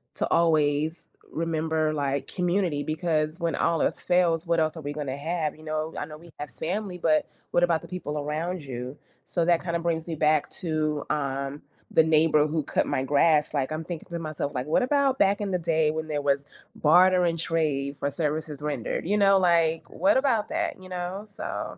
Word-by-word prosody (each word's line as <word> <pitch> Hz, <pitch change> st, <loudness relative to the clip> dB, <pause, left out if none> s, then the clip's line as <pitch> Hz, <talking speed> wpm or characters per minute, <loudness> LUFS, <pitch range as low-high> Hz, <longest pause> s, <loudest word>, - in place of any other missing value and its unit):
to -, -, -1 dB
always 155 Hz, -1 st, +2 dB, 0.2 s
remember, 160 Hz, -1 st, -1 dB
like, 140 Hz, -1 st, -1 dB
community 180 Hz, -5 st, 0 dB
because 155 Hz, 0 st, -1 dB
when 170 Hz, -1 st, 0 dB
all 165 Hz, -2 st, +1 dB
else -, -, 0 dB
fails, 175 Hz, -2 st, +2 dB
what 170 Hz, -1 st, +2 dB
else 155 Hz, +1 st, 0 dB
are 160 Hz, -, -6 dB
we 145 Hz, 0 st, -4 dB
gonna 140 Hz, -2 st, -4 dB
have, 160 Hz, 0 st, -2 dB
you 155 Hz, -, -15 dB
know? 155 Hz, 0 st, -3 dB
I -, -, -2 dB
know 155 Hz, -1 st, -10 dB
we 170 Hz, +1 st, -15 dB
have 145 Hz, 0 st, -5 dB
family, 185 Hz, -, -3 dB
but 160 Hz, -3 st, +2 dB, 0.2 s
what 175 Hz, -, +3 dB
about 170 Hz, -2 st, +2 dB
the -, -, -11 dB
people 150 Hz, -5 st, -4 dB
around 160 Hz, +5 st, -3 dB
you? 130 Hz, -1 st, -6 dB, 0.3 s
So, 170 Hz, -, -1 dB
that 170 Hz, -1 st, +3 dB
kinda 170 Hz, -1 st, -1 dB
brings 165 Hz, -1 st, -2 dB
me 165 Hz, -, -3 dB
back 155 Hz, 0 st, +2 dB
to, 155 Hz, -3 st, -1 dB
um, 140 Hz, -1 st, -2 dB, 0.3 s
the 160 Hz, -, +5 dB
neighbor 155 Hz, -1 st, +4 dB
who 155 Hz, 0 st, -1 dB
cut -, -, 0 dB
my 130 Hz, -, 0 dB
grass. 150 Hz, +2 st, +3 dB
Like, 140 Hz, -1 st, -1 dB
I'm 155 Hz, -, -3 dB
thinking 170 Hz, -1 st, -7 dB
to 170 Hz, -, -3 dB
myself, 155 Hz, -3 st, -4 dB
like, 125 Hz, 0 st, -2 dB
what 155 Hz, -, +2 dB
about 275 Hz, 0 st, +2 dB
back 200 Hz, +1 st, +3 dB
in 200 Hz, -2 st, -2 dB
the 180 Hz, -, 0 dB
day 160 Hz, -2 st, +2 dB
when 160 Hz, 0 st, -4 dB
there 150 Hz, -2 st, -2 dB
was 140 Hz, 0 st, +1 dB, 0.3 s
barter 180 Hz, +3 st, +5 dB
and 165 Hz, -1 st, 0 dB
trade 145 Hz, -4 st, -1 dB
for 140 Hz, -, -1 dB
services 150 Hz, 0 st, -2 dB
rendered? 150 Hz, -1 st, -3 dB
You 205 Hz, +2 st, +2 dB
know, 195 Hz, -1 st, +5 dB
like, 165 Hz, -3 st, +2 dB
what 290 Hz, 0 st, +2 dB
about 260 Hz, -6 st, +2 dB
that, 330 Hz, -, -2 dB
you 185 Hz, -, -11 dB
know? 180 Hz, +3 st, -4 dB
So, 200 Hz, -, -5 dB
160 Hz, 205 wpm, -26 LUFS, 150-175 Hz, 0.3 s, the